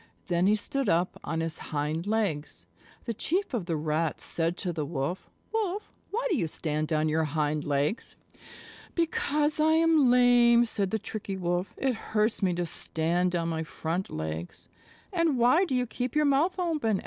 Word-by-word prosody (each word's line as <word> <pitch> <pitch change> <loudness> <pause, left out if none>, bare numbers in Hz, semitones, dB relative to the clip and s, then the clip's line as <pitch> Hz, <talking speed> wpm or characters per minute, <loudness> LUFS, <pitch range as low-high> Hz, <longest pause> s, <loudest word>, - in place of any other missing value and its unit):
Then 175 +1 +2
he 210 - +5
stood 265 +3 -2
up 175 +2 +1
on 165 -1 -2
his 165 0 -3
hind 155 +4 -2
legs. 205 -9 -2 0.4
The 230 - -2
Chief 355 - -1
of 205 -8 -2
the 165 - 0
Rats 155 +1 -1
said 165 +2 +1
to 180 -2 -3
the 155 -2 -2
Wolf, 145 +4 -3 0.2
"Wolf, 420 -2 -2 0.2
why 470 +4 -2
do - - +3
you 175 - 0
stand 155 0 -2
on 155 0 +2
your 160 +1 +1
hind 150 0 -1
legs?" 145 - -1 0.8
"Because 305 -3 +1
I 315 +1 +4
am 320 -4 +4
lame," 240 -1 +5
said 200 -4 -1
the 220 - 0
Tricky 205 -2 -5
Wolf. 175 +1 -2
"It 265 -1 +1
hurts 220 -1 -1
me 185 -3 +1
to 175 0 -1
stand 175 +2 0
on 170 -1 0
my 160 -1 -2
front 165 +3 -3
legs." 80 +2 -6 0.4
"And 335 -6 +2
why 250 +10 +4
do 270 - -2
you 250 0 +1
keep 245 +2 -4
your 300 0 +3
mouth 290 +7 +2
open?" 305 - 0
195 Hz, 180 wpm, -28 LUFS, 160-260 Hz, 0.8 s, he